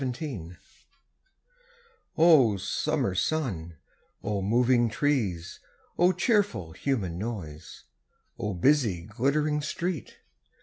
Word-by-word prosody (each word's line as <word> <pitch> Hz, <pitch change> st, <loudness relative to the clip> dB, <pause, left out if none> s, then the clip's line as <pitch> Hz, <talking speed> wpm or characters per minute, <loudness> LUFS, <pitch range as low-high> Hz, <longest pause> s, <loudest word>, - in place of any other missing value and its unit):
O 150 Hz, -, +6 dB
Summer 135 Hz, +3 st, -1 dB
sun, 95 Hz, -, -2 dB, 0.5 s
O 105 Hz, -2 st, -1 dB
moving 120 Hz, +3 st, +3 dB
trees! 110 Hz, -, -1 dB, 0.4 s
O 175 Hz, +1 st, +5 dB
cheerful 205 Hz, -, +1 dB
human 95 Hz, -6 st, -2 dB
noise, 90 Hz, -8 st, -7 dB, 0.6 s
O 105 Hz, -2 st, -2 dB
busy 110 Hz, -, +2 dB
glittering 140 Hz, -, 0 dB
street! 170 Hz, 0 st, -4 dB
120 Hz, 80 wpm, -27 LUFS, 95-150 Hz, 0.6 s, O